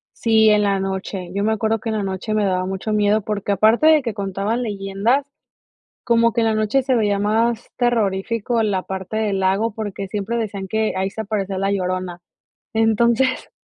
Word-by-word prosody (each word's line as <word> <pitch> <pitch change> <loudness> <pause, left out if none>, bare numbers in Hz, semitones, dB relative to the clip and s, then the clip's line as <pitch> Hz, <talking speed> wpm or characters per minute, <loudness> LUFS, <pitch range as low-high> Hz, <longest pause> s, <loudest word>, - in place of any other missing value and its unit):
Sí, 220 -1 +4
en 210 0 +4
la 200 -1 +1
noche. 190 -1 -4
Yo 200 +1 -1
me 220 +1 +2
acuerdo 220 +1 0
que 225 - -5
en 220 - -1
la 205 - -2
noche 190 +2 -3
me 215 -1 +1
daba 185 -1 0
mucho 190 +3 -4
miedo, 210 +1 +2
porque 205 -1 -2
aparte 220 - +4
de 315 -1 +6
que 230 -3 -3
contaban 200 +3 -2
leyendas, 210 +4 0 0.8
como 230 -1 +3
que 235 - 0
en 225 - +2
la 220 - +2
noche 215 +5 +1
se 260 0 +1
veía 205 -4 +1
más 225 +3 0
terrorífico 230 0 0
la 200 -4 0
parte 190 +3 -5
del 210 -3 0
lago 195 +4 +1
porque 205 -3 -5
siempre 210 +3 -3
decían 200 -4 -4
que 220 +2 0
ahí 190 +1 -1
se 220 - -5
aparecía 200 -2 -3
La 195 +1 0
Llorona. 185 -2 -3 0.5
Entonces, 230 +3 +2
210 Hz, 195 wpm, -20 LUFS, 195-225 Hz, 0.8 s, de